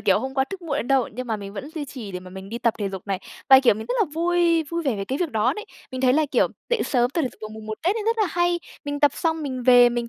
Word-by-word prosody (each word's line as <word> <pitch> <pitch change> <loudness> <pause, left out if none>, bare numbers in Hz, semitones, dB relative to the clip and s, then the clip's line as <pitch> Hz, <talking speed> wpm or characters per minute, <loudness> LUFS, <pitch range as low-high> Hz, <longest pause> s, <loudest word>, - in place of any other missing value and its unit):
kiểu, 195 +1 +3
hôm 265 +3 -5
qua 265 -1 +2
thức 380 +3 -8
muộn 295 -4 -2
đến 245 - -3
đâu, 270 -3 +3
nhưng 255 +3 -5
mà 225 -2 -1
mình 200 -1 -8
vẫn 260 +9 -7
duy 300 -2 -3
trì 235 -8 -8
để 180 - -4
mà 185 0 -11
mình 190 +1 -9
đi 235 +2 -4
tập 235 -2 +1
thể 205 -2 -1
dục 190 0 -7
này, 195 -2 -1 0.3
và, 265 0 +9
kiểu, 245 -6 +5
mình 220 - -7
rất - - -1
là 430 - +5
vui 340 0 +2
vui 335 +3 -4
vẻ 265 -8 0
về 195 - -3
cái 265 +6 -3
việc 350 -4 -1
đó 225 +3 +2
đấy. 425 +7 -6 0.3
Mình 255 - -4
thấy 255 -1 +4
là, 310 +1 +3
kiểu, - - +3 0.2
dậy 485 - +2
sớm 245 -1 +1
tập 330 - -1
thể 260 - 0
dục - - -21
vào 215 - -4
Mùng 220 0 -10
1 215 - -3
Tết 375 +6 +2
ấy 440 - -2
rất 455 0 +1
là 425 - +3
hay, 345 0 +1 0.3
mình 290 0 -3
tập 290 -2 +6
xong 325 -1 -1
mình 260 -3 -4
về, 245 -1 +7
mình 240 -1 -2
260 Hz, 340 wpm, -24 LUFS, 220-325 Hz, 0.3 s, và